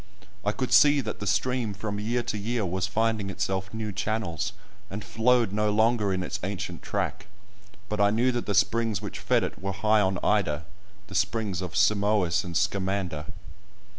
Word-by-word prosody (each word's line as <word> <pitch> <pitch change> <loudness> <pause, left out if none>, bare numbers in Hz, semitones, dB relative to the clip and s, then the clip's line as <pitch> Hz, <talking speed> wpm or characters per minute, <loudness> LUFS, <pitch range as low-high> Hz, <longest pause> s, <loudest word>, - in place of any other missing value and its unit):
I 105 - +2
could 125 +4 -2
see 145 0 +7
that 110 -4 -5
the 105 - -4
stream 125 -2 0
from 105 0 -4
year 120 +3 0
to - - -3
year 110 +1 -1
was 95 +1 -1
finding 110 -1 0
itself 95 -1 -2
new 110 -1 -4
channels, 100 -2 -2 0.4
and 100 +2 -5
flowed 120 -1 +2
no 105 +1 +1
longer 110 -1 +2
in 95 -1 -1
its - - -4
ancient 95 -2 -4
track, 105 0 -3 0.6
but 105 -1 -1
I 100 - +5
knew 120 +5 +2
that 120 -1 -3
the 100 - 0
springs 110 0 +2
which - - -6
fed - - +2
it - - -5
were 100 0 -2
high 105 +2 +3
on 95 -1 +1
Ida—the 100 +2 -2
springs 100 -1 0
of 90 -3 -5
Simois 100 -4 +3
and 85 -2 -2
Scamander! 95 -7 -1
105 Hz, 175 wpm, -27 LUFS, 95-110 Hz, 0.6 s, see